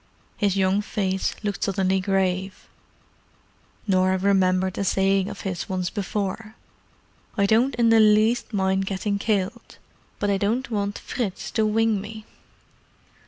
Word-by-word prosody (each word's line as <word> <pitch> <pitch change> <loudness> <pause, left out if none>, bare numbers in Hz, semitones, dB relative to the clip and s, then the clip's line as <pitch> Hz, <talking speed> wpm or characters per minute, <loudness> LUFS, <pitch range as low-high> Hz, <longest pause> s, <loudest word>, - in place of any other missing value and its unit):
His 200 -2 0
young 190 +1 +2
face 190 -3 -2
looked 205 -1 -2
suddenly 190 -1 +1
grave; 190 0 -1 1.2
Norah 185 -2 +2
remembered 185 -1 +1
a - - 0
saying 195 0 +1
of - - -8
his 180 -3 -4
once 185 -2 -2
before—"I 205 +1 -5
don't 235 +6 +3
in 235 -1 +3
the 225 0 +6
least 220 +3 +3
mind 190 -1 0
getting 200 +1 -2
killed, 215 +2 -2 0.4
but 205 0 0
I 200 - +2
don't 230 +6 -1
want 205 -1 -2
Fritz 215 -7 -4
to 220 -1 +1
wing 220 -1 +1
me." 215 +1 -9
200 Hz, 130 wpm, -24 LUFS, 190-215 Hz, 1.2 s, the